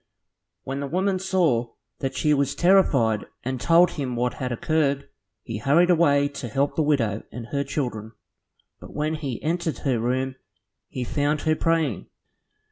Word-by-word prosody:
When 135 +1 -4
the 140 - -3
woman 185 +4 0
saw 165 -12 +1 0.3
that 135 - -3
she 150 -1 +2
was 140 -1 0
terrified 140 - +3 0.2
and 130 -1 -3
told 170 +1 +5
him 130 -5 -4
what 125 +1 0
had 125 -1 -4
occurred. 140 +2 0 0.4
He 110 -3 -5
hurried 165 +9 +4
away 145 -4 +4
to 140 -3 -6
help 135 +5 0
the - - +1
widow 120 -9 +1
and 120 -2 -7
her 140 -1 0
children, 120 -6 -4 0.7
but - - -12
when 150 +1 -1
he 140 -7 -4
entered 165 0 -1
her 130 -4 +1
room, 130 +3 -1 0.5
he 125 - -5
found 145 +3 0
her 155 0 +2
praying. 160 - 0
140 Hz, 160 wpm, -24 LUFS, 125-160 Hz, 0.7 s, told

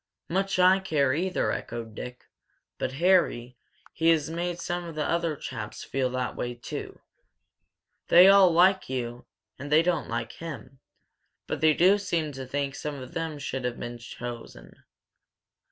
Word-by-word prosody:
"Much 195 +2 0
I 185 +1 +6
care, 145 -8 +1
either!" 180 +5 0
echoed 115 -1 -5
Dick. 125 +3 -8 0.5
"But, 130 - -2
Harry, 145 -7 +2 0.4
he 165 0 +2
has 160 -2 +2
made 175 +1 -3
some 175 0 -3
of 165 -2 -8
the 150 -1 -1
other 170 -2 0
chaps 115 -6 -7
feel 130 -1 -1
that 125 0 -3
way, 120 0 -4
too. 120 - -7 1.1
They 180 +2 +8
all 195 -1 +7
like 185 +1 +4
you, 120 -2 -4 0.3
and 145 +2 -7
they 155 +2 +6
don't 170 -6 0
like 115 0 -3
him. 135 -5 -9 0.7
But - - -4
they 155 -1 +5
do 190 +4 +5
seem 165 -6 -1
to 135 -2 -7
think 140 0 -2
some 150 +1 -5
of 130 -2 -9
them 165 -2 -3
should 135 -2 -4
have 125 -1 -3
been 120 0 -6
chosen." 120 0 -9
150 Hz, 160 wpm, -27 LUFS, 125-175 Hz, 1.1 s, They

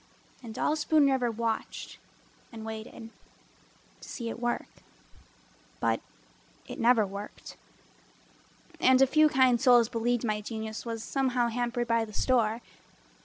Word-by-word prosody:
And 225 -3 -9
all 300 - +1
Spoon 305 -1 +3
River 250 -2 +1
watched 225 0 -4 0.5
and 220 -2 -8
waited 220 +1 -8 0.9
To - - -11
see 235 -2 -5
it 230 - -6
work, 240 0 -3 1.0
but 115 0 0 0.7
it - - -8
never 230 -2 +4
worked. 200 +1 -9 1.2
And 260 0 +5
a - - +7
few 305 +3 +4
kind 255 -4 +3
souls 240 -3 +5
believed 235 +1 0
my 210 -1 -1
genius 220 +1 -6
Was 225 -1 -4
somehow 255 -3 0
hampered 240 0 -2
by 230 0 +2
the 215 - -13
store. 230 -1 +1
235 Hz, 130 wpm, -29 LUFS, 220-250 Hz, 1.2 s, a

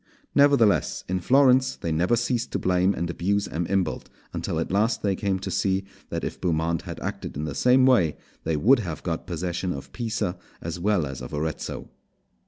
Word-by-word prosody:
Nevertheless, 130 - +4
in 95 0 -1
Florence 130 +3 +4
they 85 - -4
never 90 +8 +2
ceased 120 +1 -1
to - - +1
blame 90 +1 +2
and 85 - -2
abuse 100 +4 0
M. 85 +1 -3
Imbalt, 95 -4 -1 0.3
until - - -2
at - - -2
last 110 +4 +1
they 100 -2 +1
came 95 0 0
to 95 - -5
see 95 -1 +1 0.3
that - - -3
if - - -5
Beaumont 85 -1 0
had - - -7
acted - - -5
in 75 - -3
the 75 -2 -3
same 125 - +4
way, 95 - +4 0.3
they 80 -1 0
would 120 - +5
have 85 -8 -5
got 85 0 -3
possession 90 +1 -2
Of 70 - -7
Pisa 110 -6 -2 0.2
as 85 +1 -5
well 100 -3 +2
as 65 -3 -6
of 60 +4 -6
Arezzo. 75 +1 -4
95 Hz, 190 wpm, -25 LUFS, 85-110 Hz, 0.3 s, would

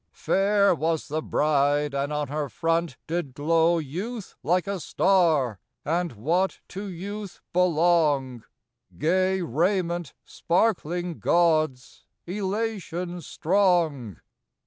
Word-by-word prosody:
Fair 200 0 +2
was 160 -1 -1
the 155 +2 -1
bride, 145 -1 +1
and 140 +1 -1
on 150 -1 -1
her 145 +1 -3
front 165 -2 -1
did 160 -6 -3
glow 165 +3 +3
Youth 185 - -5
like 175 +6 +1
a 200 -1 -3
star; 160 - +2 0.3
and 170 +1 -1
what 165 - 0
to 195 +2 -6
youth 200 +2 -7
belong, 155 -8 +2 0.5
Gay 185 +4 +1
raiment 170 - -1
sparkling 175 -2 -1
gauds, 155 - +1 0.2
elation 190 -3 -3
strong. 165 - +1
170 Hz, 100 wpm, -25 LUFS, 150-185 Hz, 0.5 s, glow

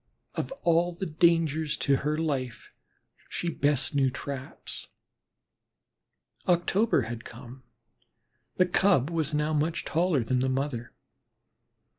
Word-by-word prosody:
Of - - -3
all 170 +1 +3
the 170 +3 -4
dangers 160 -2 +2
to 140 -1 +2
her 150 +3 -1
life 135 -7 -3 0.6
she 175 - -2
best 145 -2 +1
knew 135 -2 +3
traps. 135 +1 -6 1.6
October 180 - +3
had 115 +1 -6
come; 125 +2 -11 0.9
the 185 - +4
Cub 180 -5 +3
was 160 -2 -1
now 150 +1 +1
much 155 +2 0
taller 165 -5 +1
than 125 +3 0
the 130 +1 +1
mother. 130 -3 -2
150 Hz, 115 wpm, -28 LUFS, 130-170 Hz, 1.6 s, the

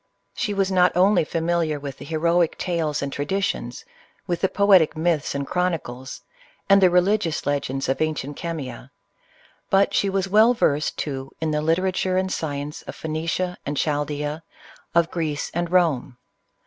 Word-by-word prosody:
She 225 - -2
was 195 -1 +1
not 180 -1 +3
only 190 0 +4
familiar 165 -1 -1
with 140 -2 -7
the - - -9
heroic 170 +2 +1
tales 160 -5 -1
and 140 - -4
traditions, 190 +8 -2 0.4
with 175 -2 -2
the 190 - +2
poetic 195 -7 +4
myths 160 -3 0
and 140 0 -2
chronicles, 150 -8 -3 0.5
and 195 0 +6
the 185 - +6
religious 180 -2 +1
legends 140 -1 -1
of 135 - -1
ancient 150 -2 -2
Chemia; 140 -7 -6 0.8
but 195 +1 +3
she 200 - +2
was 195 0 0
well 220 +5 +5
versed, 150 -8 +1
too, 135 -2 -4
in 160 -1 -1
the 150 0 0
literature 185 +3 +1
and 185 0 0
science 145 -1 -4
of - - -9
Phoenicia 165 +3 -2
and 145 +1 -4
Chaldsea, 150 +1 -1 0.5
of 170 -1 +3
Greece 155 -4 -2
and 175 0 -1
Rome. 155 -9 +1
165 Hz, 155 wpm, -23 LUFS, 145-185 Hz, 0.8 s, and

